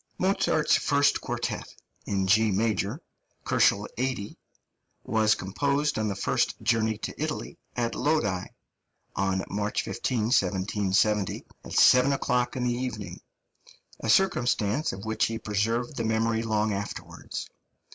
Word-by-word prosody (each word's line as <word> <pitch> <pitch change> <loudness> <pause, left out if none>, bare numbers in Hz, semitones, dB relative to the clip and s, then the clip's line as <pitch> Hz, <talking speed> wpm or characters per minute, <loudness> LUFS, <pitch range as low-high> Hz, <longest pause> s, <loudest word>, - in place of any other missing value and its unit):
Mozart's 185 -5 +2
first 145 0 +2
quartet, - - -4 0.3
in 95 -1 0
G 110 +3 +4
major 110 - 0 0.4
(80 100 +1 +3 0.4
K.), - - -16 0.7
was 110 -1 +2
composed 140 +8 -1
on 110 - 0
the 100 - -2
first 100 - 0
journey 110 -1 +1
to - - -5
Italy, - - -4 0.2
at 120 -1 -1
Lodi, 105 - 0 0.7
on 95 -1 0
March 105 +1 -1
15, 120 -1 -2
1770, 100 0 +1 0.2
at - - -9
seven 125 +2 +6
o'clock 125 -2 0
in 125 - -2
the 120 -1 +1
evening 115 -8 -5 0.8
a 110 - -4
circumstance 125 - +2
of 95 +2 -8
which 110 0 +1
he 115 - -3
preserved 115 +5 -1
the 115 - -2
memory 110 0 +1
long 110 -1 0
afterwards. 100 +1 -6
110 Hz, 125 wpm, -27 LUFS, 100-125 Hz, 0.8 s, seven